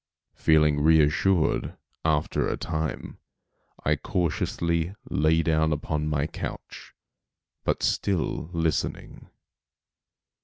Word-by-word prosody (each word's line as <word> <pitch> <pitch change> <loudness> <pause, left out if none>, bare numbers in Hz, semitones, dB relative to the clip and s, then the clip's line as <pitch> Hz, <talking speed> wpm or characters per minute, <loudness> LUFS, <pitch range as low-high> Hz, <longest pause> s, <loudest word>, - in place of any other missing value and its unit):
Feeling 75 -2 +3
reassured, 80 +3 +3 0.3
after 80 -1 +1
a - - -2
time, 80 -1 -4 0.7
I 75 - +3
cautiously 85 +3 -1 0.2
lay 80 +2 +3
down 80 0 +2
upon 75 +1 -2
my 75 -1 0
couch, - - -7 0.7
but - - -1
still 85 -4 0
listening. 80 -3 -2
80 Hz, 85 wpm, -26 LUFS, 75-80 Hz, 0.7 s, Feeling